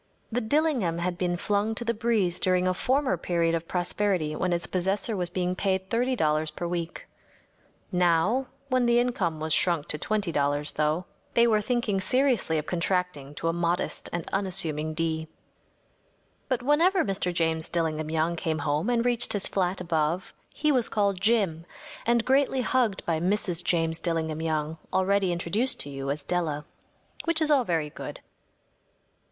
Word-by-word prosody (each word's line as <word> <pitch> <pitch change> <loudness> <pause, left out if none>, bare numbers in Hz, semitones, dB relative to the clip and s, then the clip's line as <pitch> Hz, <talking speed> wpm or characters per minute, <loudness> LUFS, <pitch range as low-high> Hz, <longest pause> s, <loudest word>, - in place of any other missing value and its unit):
‚ÄĚ - - -41 0.3
The 245 +2 0
‚ÄúDillingham‚ÄĚ 240 - +1
had 180 0 -1
been 175 -1 -1
flung 205 +4 0
to 235 - -2
the 235 - +1
breeze 215 -6 +1
during 185 0 +2
a 185 - +2
former 260 +1 +1
period 170 -1 0
of 165 0 -2
prosperity 180 -3 0
when 180 - -1
its 170 -1 0
possessor 195 +4 -1
was 180 -2 -1
being 180 0 -1
paid 190 0 -1
$30 160 -11 +1
per 175 - -3
week. 170 -1 -4 0.9
Now, 180 +9 +2 0.2
when 255 -2 +2
the 235 0 +4
income 195 -10 0
was 155 0 0
shrunk 170 -4 +2
to 150 - -1
$20, 150 -9 0
though, 155 +4 0 0.3
they 235 - +6
were 215 -2 +3
thinking 215 -4 0
seriously 250 - +2
of 150 - -2
contracting 175 -5 -1
to 165 - -3
a 165 - +1
modest 170 +1 -1
and 170 -2 -4
unassuming 160 -5 -1
D. 160 -1 -1 1.2
But 255 -2 0
whenever 335 +7 +3
Mr. 195 -3 -1
James 160 -2 0
Dillingham 155 -2 -1
Young 160 +2 0
came 160 -1 -1
home 150 +6 0
and 240 -1 +1
reached 240 -1 +1
his 205 -2 -1
flat 185 -1 0
above 165 0 -1 0.2
he 305 0 +2
was 250 -5 +2
called 200 -3 0
‚ÄúJim‚ÄĚ 200 -7 +2 0.4
and 235 -1 +3
greatly 270 0 +3
hugged 240 -6 +1
by 165 -2 0
Mrs. 180 -1 0
James 165 -2 +1
Dillingham 160 -2 -1
Young, 155 0 -2
already 190 0 +2
introduced 200 +9 0
to 145 - -1
you 135 0 -4
as 145 +1 -2
Della. 155 -3 -1 0.6
Which 335 -1 +1
is 310 -1 +2
all 270 -4 +4
very 160 -5 -1
good. - - -7
180 Hz, 165 wpm, -27 LUFS, 160-220 Hz, 1.2 s, they